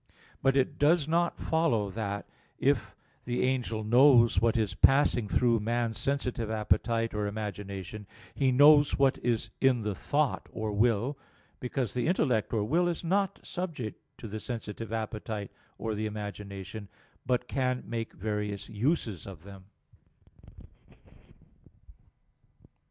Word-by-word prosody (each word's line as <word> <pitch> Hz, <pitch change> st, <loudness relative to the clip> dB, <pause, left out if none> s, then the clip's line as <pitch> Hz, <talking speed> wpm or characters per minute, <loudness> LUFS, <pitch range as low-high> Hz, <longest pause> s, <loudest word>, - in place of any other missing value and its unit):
But 135 Hz, 0 st, +3 dB
it 140 Hz, +2 st, 0 dB
does 155 Hz, +1 st, +4 dB
not 170 Hz, +2 st, +1 dB
follow 120 Hz, -12 st, +1 dB
that, 100 Hz, -1 st, -4 dB, 0.3 s
if 110 Hz, -8 st, +1 dB, 0.3 s
the 120 Hz, 0 st, -1 dB
angel 125 Hz, -4 st, -1 dB
knows 120 Hz, +1 st, +5 dB
what 115 Hz, 0 st, +2 dB
is 105 Hz, -5 st, 0 dB
passing 130 Hz, +1 st, +4 dB
through 115 Hz, +2 st, +2 dB
man's 115 Hz, +1 st, -1 dB
sensitive 125 Hz, -5 st, -1 dB
appetite 115 Hz, +1 st, 0 dB
or 105 Hz, -1 st, -1 dB
imagination, 100 Hz, -1 st, -6 dB, 0.3 s
he 135 Hz, -2 st, +2 dB
knows 145 Hz, +2 st, +6 dB
what 135 Hz, -1 st, +3 dB
is 120 Hz, -2 st, -1 dB
in 130 Hz, -3 st, +4 dB
the 105 Hz, -1 st, -1 dB
thought 145 Hz, +8 st, -1 dB
or 110 Hz, -1 st, -3 dB
will: 115 Hz, +6 st, +1 dB, 0.4 s
because 125 Hz, -3 st, -2 dB
the 125 Hz, -, -1 dB
intellect 130 Hz, -, +1 dB
or 110 Hz, -3 st, +1 dB
will 170 Hz, +11 st, +2 dB
is 175 Hz, -1 st, -2 dB
not 195 Hz, +3 st, 0 dB
subject 160 Hz, -, -5 dB, 0.2 s
to 115 Hz, -, -8 dB
the 110 Hz, +1 st, -5 dB
sensitive 115 Hz, -1 st, -6 dB
appetite 110 Hz, -2 st, -4 dB, 0.3 s
or 110 Hz, -, -3 dB
the 110 Hz, +1 st, -2 dB
imagination, 100 Hz, -1 st, -7 dB, 0.4 s
but 125 Hz, 0 st, 0 dB
can 130 Hz, -1 st, -1 dB
make 115 Hz, +1 st, -4 dB
various 105 Hz, -1 st, -3 dB
uses 110 Hz, -, -1 dB
of 90 Hz, -5 st, -10 dB
them. 95 Hz, -1 st, -12 dB
115 Hz, 130 wpm, -29 LUFS, 105-135 Hz, 0.4 s, knows